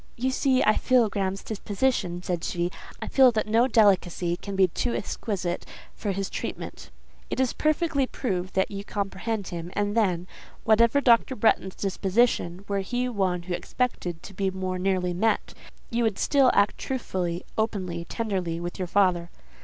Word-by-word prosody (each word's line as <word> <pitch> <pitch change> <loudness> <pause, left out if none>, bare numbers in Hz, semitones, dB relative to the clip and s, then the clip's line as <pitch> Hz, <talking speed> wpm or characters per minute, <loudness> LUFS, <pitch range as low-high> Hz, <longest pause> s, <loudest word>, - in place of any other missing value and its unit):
"You 255 +2 0
see 260 0 +2
I 215 - +4
feel 250 -4 +3
Graham's 195 -1 -2
disposition," 200 -4 -1
said 175 -2 -2
she. 175 0 -1 0.3
"I - - -5
feel 265 -2 +6
that 215 - 0
no 225 +4 +3
delicacy 190 -6 +3
can 200 +2 -7
be 190 -1 +5
too 235 +8 -2
exquisite 185 -5 -3 0.3
for 205 - -3
his 195 0 -2
treatment." - - -6 0.4
"It - - -3
is 260 -2 +2
perfectly 310 -3 +1
proved 185 -9 -3
that 190 +2 +1
you 200 0 -5
comprehend 200 +1 -3
him, 170 0 -5
and 205 +1 -1
then—whatever 220 +5 +1
Dr. 245 +1 +4
Bretton's 205 -4 +2
disposition, 195 -2 0
were 200 -1 0
he 245 +6 -1
one 185 -6 0
who 180 0 -4
expected 175 -3 -2
to 195 - -10
be 195 +1 0
more 185 -1 -3
nearly 185 -1 0
met—you 225 +3 -2
would 220 -4 +1
still 275 -3 +4
act 200 +1 +3
truthfully, 185 -9 -3
openly, 185 -6 -2
tenderly, 185 -8 -2
with 175 +3 -5
your 185 - -2
father." 175 -3 +2
200 Hz, 160 wpm, -26 LUFS, 180-230 Hz, 0.4 s, feel